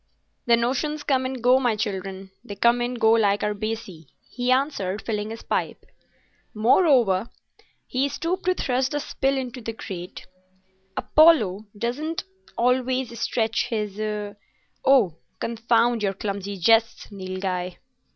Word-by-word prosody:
"The 235 0 +6
notions 285 +6 -1
come 260 -3 +1
and 260 -2 -6
go, 250 +2 +5
my 245 -4 +1
children—they 195 0 -5
come 235 +4 +3
and 240 0 -2
go 220 0 +5
like 210 -3 +3
our 210 - 0
"baccy," 205 -7 -5 0.2
he 245 0 -1
answered, 255 -8 0
filling 210 -1 -3
his 225 0 -8
pipe. - - -2 0.7
"Moreover," 230 - +3 0.6
he 265 +2 0
stooped 345 +5 -3
to 365 0 +2
thrust 255 -1 0
a - - +1
spill 275 -1 -1
into 255 -1 -5
the 225 0 -5
grate, 185 -4 -8 0.7
"Apollo 220 - +4
does 240 +5 -2
not 320 +2 -3 0.3
always 250 -1 0
stretch 225 -1 0
his—— 210 -1 -3 0.5
Oh, 230 - +4 0.2
confound 230 0 +1
your 195 -2 0
clumsy 200 0 -4
jests, 225 +4 +2
Nilghai!" 185 -2 -4
230 Hz, 130 wpm, -24 LUFS, 200-255 Hz, 0.7 s, The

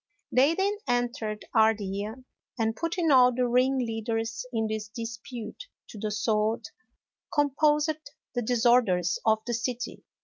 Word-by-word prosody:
They 275 +6 +4
then 400 +3 0
entered 240 -3 -1
Ardea, 215 -1 +1 0.4
and 225 -1 0
putting 335 +1 0
all 250 -2 +7
the 250 0 0
ringleaders 235 -2 0
in 225 -2 0
this 215 -1 -3
dispute 230 - -7 0.2
to 215 - -9
the 215 - -2
sword, 215 +1 0 0.7
composed 295 +1 +1 0.2
the 245 - -1
disorders 230 -7 +3
of 220 0 +3
the 240 - -2
city. 245 +1 -3
235 Hz, 125 wpm, -28 LUFS, 220-255 Hz, 0.7 s, all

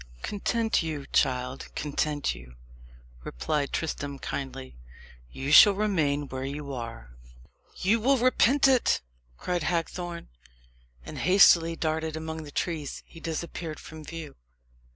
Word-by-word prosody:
"Content 225 +2 0
you, 155 -4 -4
child 125 0 0
content 150 - -1
you," 60 0 -13 0.7
replied 140 - -2
Tristram 145 -3 -3
kindly. 130 - -6 0.6
"You 135 - -4
shall 205 +6 +9
remain 160 -9 0
where 130 0 -5
you 140 +1 -5
are." 115 - -7 0.6
"You 210 +5 +2
will 265 +5 +3
repent 255 +2 +4
it!" 260 -3 +3 0.4
cried 180 -1 -2
Hagthorne. 170 +1 -3 0.8
And - - -7
hastily 170 -3 +6
darting 160 0 -2
among 160 0 -5
the 150 -2 -10
trees, 155 -4 -3
he 165 - -14
disappeared 165 -1 -5
from 155 -1 -10
view. 160 -1 -8
160 Hz, 120 wpm, -27 LUFS, 140-175 Hz, 0.8 s, shall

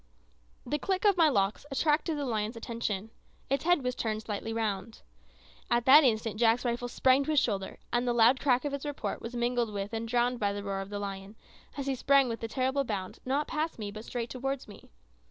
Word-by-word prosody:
The 295 - -1
click 380 +4 -1
of 405 -2 +5
my 330 -3 +5
locks 200 -5 0
attracted 300 +3 +1
the 285 - -2
lion's 220 -2 -2
attention; 225 -3 -4 0.4
its 275 +2 0
head 350 -5 +3
turned 215 -1 -2
slightly 215 +1 -4
round. 220 -2 -3 0.7
At 240 0 +2
that 290 +4 +9
instant 220 -3 +1
Jack's 235 +1 +3
rifle 240 +1 -1
sprang 260 +3 +3
to - - -5
his 305 -2 +4
shoulder, 195 -6 -2 0.2
and 240 +1 +1
the - - +3
loud 235 +3 +5
crack 260 -1 +2
of 285 - -2
its 280 - -4
report 290 -1 -4
was 235 +2 -6
mingled 240 -1 0
with 200 +1 -4
and 225 0 -3
drowned 245 +1 +1
by 200 -1 0
the 205 0 -5
roar 195 -1 -3
of 195 - -7
the 205 - -4
lion, 200 0 -6 0.4
as 275 - -3
he 275 - 0
sprang 275 +1 +4
with 230 -1 -4
a 225 - -3
terrible 265 +3 0
bound, 200 -6 -4
not 280 +3 0
past 315 +2 -2
me, 210 -2 -5
but 215 +1 -8
straight 235 -1 -4
towards 270 +1 -3
me. 205 - -14
240 Hz, 215 wpm, -30 LUFS, 215-275 Hz, 0.7 s, that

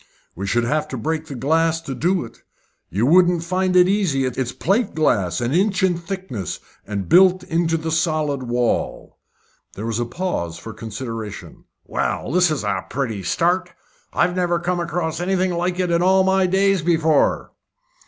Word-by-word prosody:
"We 100 +3 -4
should 120 +4 +1
have 150 +6 0
to 130 - -5
break 160 +6 -2
the 140 - -7
glass 160 +5 +1
to 140 - -6
do 175 +2 0
it. 115 - -15 0.5
You 105 +5 0
wouldn't 175 +2 +4
find 185 +1 0
it 180 0 +6
easy. 185 -10 +1
It's 130 -1 -2
plate 195 - 0
glass, 100 - +1
an 120 +2 -1
inch 190 +2 +1
in 185 -2 +3
thickness, 170 - -5 0.3
and 100 -2 -3
built 185 +1 +5
into 165 -1 0
the 160 0 -4
solid 155 -3 0
wall." 120 -1 -2 0.6
There 105 - -5
was 115 0 -2
a 120 - 0
pause 115 - -3
for 110 +6 -9
consideration. 110 -1 -7 0.2
"Well, - - -2
this 180 +1 +4
is 155 -3 -2
a - - -1
pretty 120 -6 -3
start. 175 - 0 0.4
I've 175 0 +1
never 175 -1 +1
come 175 +1 -1
across 165 -2 -2
anything 185 0 0
like 175 +1 -1
it 180 -2 0
in 170 0 +2
all 190 +1 +4
my 190 0 +3
days 195 0 +2
before." 160 -2 +2
165 Hz, 175 wpm, -21 LUFS, 125-180 Hz, 0.6 s, it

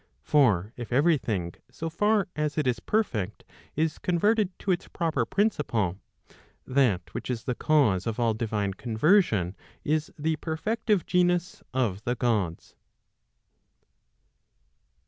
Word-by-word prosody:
For 110 - +3
if 120 -1 -7
every 150 +4 +4
thing 90 -8 -3 0.2
so 165 - -5
far 205 +5 +2
as 150 0 -2
it 155 - +1
is 125 -2 +1
perfect, 110 - -1 0.3
is 155 0 0
converted 205 +3 +2
to 195 - -1
its 175 - -1
proper 165 -2 -1
principle, 120 - 0 0.7
that 125 -9 +1
which - - -5
is 120 -2 -2
the 125 - -1
cause 120 -10 +2
of 115 +1 -2
all 115 -2 +2
divine 105 -3 -2
conversion, 110 - +2 0.3
is 155 +1 0
the 155 +1 0
perfective 205 +5 -1
genus 180 0 +1
of 110 -6 -1
the 120 +1 -1
Gods. 105 -9 -1
135 Hz, 125 wpm, -27 LUFS, 110-170 Hz, 0.7 s, every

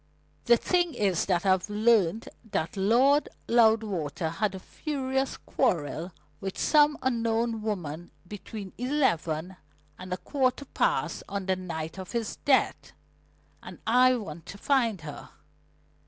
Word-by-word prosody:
"The 235 - +6
thing 350 +4 +1
is 195 -5 +1
that 185 0 +1
I've 190 +1 +2
learnt 215 -2 +2 0.2
that 195 -4 -2
Lord 245 +9 +3 0.2
Loudwater 210 -10 +2
had 195 +4 -1
a - - -6
furious 265 - -3
quarrel 165 +2 -1 0.3
with 195 -1 -5
some 295 -1 +4
unknown 230 -2 0
woman 175 -6 -4 0.2
between 205 0 -8
eleven 185 - 0 0.4
and 185 0 -9
a 180 - -1
quarter 265 +3 0
past - - 0
on 200 -1 -3
the 190 0 +1
night 165 -1 -5
of 185 +3 -8
his 230 -2 -2
death, 275 -2 +1 0.7
and - - -10
I 255 +3 +5
want 170 -8 -7
to 200 - -8
find 230 - +1
her. 150 -2 -9
210 Hz, 130 wpm, -28 LUFS, 180-250 Hz, 0.7 s, The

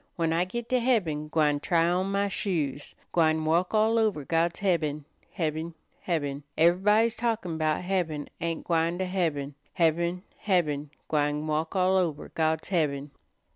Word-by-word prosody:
When 165 -2 0
I 170 +2 +2
git 235 +5 -5
to 255 - +3
heaben, 180 -12 +1
gwine 150 -2 +2
try 170 +1 +2
on 180 +2 +1
my 200 0 +1
shoes, 155 -8 -2 0.2
Gwine 160 -2 +2
walk 170 +6 +1
all 220 +2 +3
over 205 -10 0
God's 165 +3 0
heaben, 155 -6 0 0.3
heaben, 160 -1 -3 0.3
heaben. 145 -5 -1 0.2
Ever'body's 210 +7 +4
talkin' 225 -8 -2
'bout 155 +2 0
heaben 175 -6 -1
ain't 165 0 -2
gwine 170 0 +1
to 190 - -1
heaben 160 -7 -1 0.2
Heaben, 170 +1 +1 0.2
heaben, 150 -7 0 0.2
gwine 150 0 0
walk 155 +3 -2
all 185 0 +3
over 165 -5 -1
God's 160 0 0
heaben." 145 -6 0
165 Hz, 150 wpm, -27 LUFS, 155-185 Hz, 0.3 s, Ever'body's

